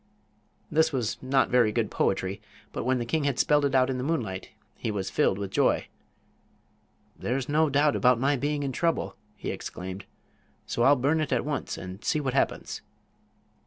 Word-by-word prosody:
This 160 +1 +3
was 120 -5 -2
not 130 +1 +2
very 120 -3 +4
good 110 -1 -1
poetry, 95 +1 0 0.3
but - - -3
when 130 0 +2
the 120 - -2
king 155 +4 0
had 140 -4 0
spelled 145 +1 +3
it 135 -1 +1
out 130 -1 +5
in 130 -1 -2
the - - -2
moonlight 115 - -2 0.3
he - - -4
was 100 -3 -3
filled 95 - +2
with 100 -1 -4
joy. - - +2 1.3
"There's 130 +1 -2
no 155 +1 +3
doubt 145 +1 +3
about 125 -2 +4
my 140 +3 +2
being 145 +2 -1
in 135 - -1
trouble," 145 - 0 0.2
he - - -4
exclaimed; 95 +2 -6 0.6
"so - - -2
I'll 135 +4 +6
burn 145 +5 +1
it 155 - -2
at - - +1
once, 150 -1 -3
and 95 +3 -8
see 155 - +1
what 135 -3 -2
happens." 135 - -1
130 Hz, 185 wpm, -27 LUFS, 110-145 Hz, 1.3 s, I'll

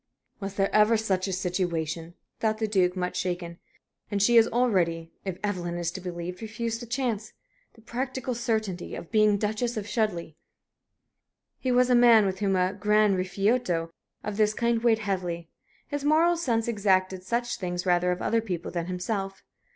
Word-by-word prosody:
"Was 195 -1 -5
there 195 0 0
ever 215 +2 +5
such 195 -3 0
a - - -2
situation?" 175 -3 -2 0.2
thought 220 -1 +1
the 220 0 -1
Duke, 185 -3 +2
much 180 -1 -2
shaken. 175 -2 -3 0.5
"And 205 - -1
she 235 +4 +4
has 225 - +7
already, 175 -9 +1
if 190 -2 -3
Evelyn 175 -4 -2
is 175 -1 -2
to 190 - -7
be 180 - -4
believed, 175 +2 -6
refused 225 +1 -3
the 240 - -7
chance 235 -3 -2 0.4
the 225 - -18
practical 255 +2 -3
certainty 220 -7 -2
of 170 - -9
being 215 -1 +4
Duchess 220 +3 -1
of 210 - -3
Chudleigh!" 205 -9 -1 1.3
He 255 - -1
was 250 0 +4
a - - +6
man 235 -3 +7
with 190 -1 -2
whom 195 -2 +1
a 185 +1 +1
gran 210 0 +3
rifiuto 185 -2 0 0.3
of 205 -1 -4
this 215 -1 +2
kind 235 -1 +1
weighed 230 -2 +4
heavily. 180 -5 -3 0.4
His 290 -1 -4
moral 320 +4 +4
sense 235 -9 0
exacted 190 -4 +1
such 240 +4 -1
things 180 -1 -3
rather 180 0 +3
of 180 - -3
other 230 0 +2
people 180 -6 -4
than 170 -1 -3
himself. 195 +1 -3
200 Hz, 175 wpm, -27 LUFS, 180-230 Hz, 1.3 s, has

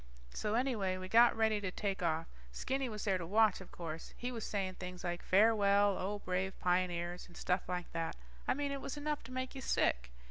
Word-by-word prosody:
So 210 +1 -1
anyway, 225 -7 +1
we 185 0 -6
got 230 +3 +6
ready 220 -2 +2
to 195 - -1
take 195 +1 -2
off. 165 -1 +1 0.3
Stinky 265 - -2
was 210 -2 -5
there 195 -3 +1
to 170 - -4
watch, 215 0 +4
of 190 - -11
course. 165 -2 -7
He 245 +1 -3
was 230 -3 -5
saying 190 -3 -2
things 180 -1 -6
like, 175 -1 -2
farewell, 205 -1 +4
O 200 +3 -2
brave 190 0 -2
pioneers, 175 -1 0
and 175 - -14
stuff 180 0 -1
like 180 -1 -3
that. 165 -1 -2 0.3
I - - +3
mean 285 0 -1
it 275 -1 -3
was 275 - -5
enough 295 0 -2
to - - -10
make 255 0 -3
you 270 - -6
sick. 60 - +1
195 Hz, 215 wpm, -35 LUFS, 180-225 Hz, 0.3 s, got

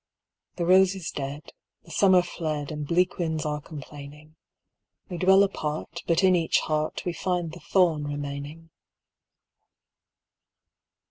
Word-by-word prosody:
The 170 - -2
rose 190 +2 +5
is 180 -4 -5
dead, 140 +1 -6 0.3
the 165 - -15
summer 185 +1 +5
fled, 155 -4 -4
And 150 -1 -5
bleak 180 +3 +1
winds 160 -3 -1
are 150 0 -2
complaining; 150 +1 -11 0.7
We 175 -2 -5
dwell 190 +2 +6
apart, 160 -3 -3
but 170 +2 +2
in 185 -1 +5
each 165 -2 +2
heart 155 0 -2
We 175 - -1
find 175 -1 -2
the 175 - -10
thorn 165 -2 +2
remaining. 145 +3 -6
160 Hz, 130 wpm, -26 LUFS, 150-180 Hz, 0.7 s, dwell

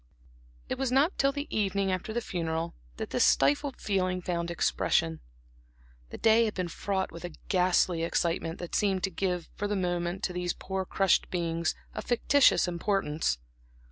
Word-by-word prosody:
It - - -3
was 265 -2 0
not 280 +8 +3
till 275 0 +4
the 285 +1 -4
evening 195 -2 +1
after 185 +3 -3
the 240 +2 -1
funeral 165 -4 -3 0.2
that - - -5
this - - +3
stifled 145 - +3
feeling 185 -2 0
found 170 -1 -2
expression. 80 - +1 0.9
The - - -7
day 225 +1 +5
had 215 - -3
been 185 -2 -2
fraught 190 +2 -2
with 165 +1 -9
a 175 -2 -6
ghastly 180 -2 +3
excitement 165 0 -1
that 175 - -7
seemed 195 -3 +1
to 195 - 0
give 180 -1 -2
for 205 - -3
the 205 - -1
moment 175 0 -1
to 180 - -1
these 180 -1 -1
poor 190 0 -4
crushed 195 0 +2
beings 170 -1 -1 0.2
a - - -4
fictitious 255 -1 +4
importance. 170 - 0
185 Hz, 170 wpm, -29 LUFS, 170-205 Hz, 0.9 s, day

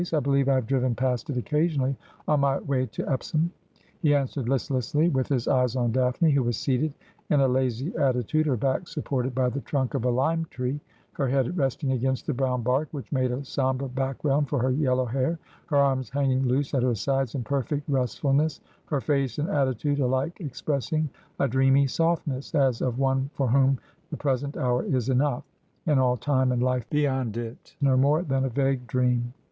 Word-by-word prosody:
I 155 - +4
believe 140 0 +2
I 135 - +4
have 130 -3 0
driven 130 -1 +1
past 125 -1 -1
it 135 - -2
occasionally 140 - 0 0.3
on 150 -1 +3
my 140 0 +2
way 130 -2 -1
to 105 - -5
Epsom,' 155 +5 0 0.5
he 150 -4 +3
answered 135 -3 -1
listlessly, 135 +4 +1
with 130 -5 0
his 125 -4 -1
eyes 125 -2 +2
on 120 -2 +1
Daphne, 130 +6 +2
who 140 -1 +3
was 120 -2 -1
seated 140 +3 0 0.3
in 150 - +4
a 135 - +4
lazy 130 +3 0
attitude, 135 +4 +1
her 130 -4 +1
back 135 - 0
supported 135 -5 -2
by 130 -1 +2
the 135 +3 -4
trunk 135 -3 -1
of - - -1
a 125 - +2
lime 160 +7 +1
tree, 130 +3 -3 0.3
her 135 - -1
head 135 +4 +1
resting 135 -2 0
against 130 0 -1
the - - -1
brown 125 -1 0
bark, 130 +6 +1
which 140 -4 -8
made 130 -3 +1
a 130 +3 -4
sombre 130 0 -1
background 135 +2 0
for 145 - 0
her 130 +1 +1
yel 130 -1 +2
low 130 0 +1
hair, 130 +7 -1 0.3
her 150 -4 +1
arms 135 -3 +2
hanging 135 -1 +1
loose 135 +3 0
at 135 - +2
her 125 -1 +2
sides 135 +3 -1
in 130 - -2
perfect 140 +3 -2
restful 135 0 0
ness, 150 +2 +1 0.3
her 145 -3 -1
face 135 -5 0
and 150 +2 -1
attitude 140 0 0
alike 130 +5 0
expressing 155 0 -2 0.3
a 140 - +3
dreamy 135 +2 +4
softness, 160 -1 -1
as 135 -5 +2
of 125 -1 -1
one 135 0 +1
for 135 - 0
whom 135 +2 +4 0.3
the - - -5
present 140 0 -1
hour 125 -1 +1
is 130 -2 -1
enough, 130 0 +1 0.4
and 150 -5 +3
all 125 -1 +3
time 130 +1 +1
and 125 0 +1
life 125 -2 0
beyond 130 -6 0
it 120 +3 -7
no 135 -2 +4
more 145 +6 +3
than 135 -4 0
a - - 0
vague 135 0 0
dream. 125 -1 +1
135 Hz, 200 wpm, -26 LUFS, 125-140 Hz, 0.5 s, I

